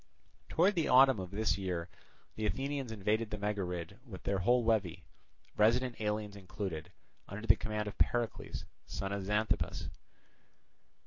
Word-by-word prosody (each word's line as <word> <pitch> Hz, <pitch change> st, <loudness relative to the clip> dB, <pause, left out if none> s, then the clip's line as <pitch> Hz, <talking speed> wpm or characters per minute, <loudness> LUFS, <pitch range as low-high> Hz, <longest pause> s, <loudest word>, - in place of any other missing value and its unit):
Towards 185 Hz, +5 st, +4 dB
the 165 Hz, -5 st, +1 dB
autumn 130 Hz, -2 st, +7 dB
of 90 Hz, -1 st, -5 dB
this 105 Hz, +1 st, 0 dB
year 90 Hz, -3 st, -2 dB, 0.5 s
the 110 Hz, 0 st, -1 dB
Athenians 135 Hz, +4 st, -2 dB
invaded 110 Hz, +1 st, 0 dB
the 105 Hz, -, -3 dB
Megarid 100 Hz, -2 st, -3 dB
with 105 Hz, -8 st, -10 dB
their 100 Hz, -1 st, 0 dB
whole 120 Hz, +5 st, +3 dB
levy, 105 Hz, -7 st, +1 dB, 0.5 s
resident 115 Hz, +2 st, +3 dB
aliens 105 Hz, -1 st, -1 dB
included, 95 Hz, -4 st, -5 dB, 0.4 s
under 105 Hz, +3 st, -6 dB
the -, -, +7 dB
command 105 Hz, -1 st, -3 dB
of 105 Hz, -, -7 dB
Pericles, 120 Hz, -2 st, 0 dB, 0.2 s
son 95 Hz, 0 st, -3 dB
of 100 Hz, -1 st, -2 dB
Xanthippus. 105 Hz, +2 st, 0 dB
105 Hz, 140 wpm, -33 LUFS, 95-115 Hz, 0.5 s, autumn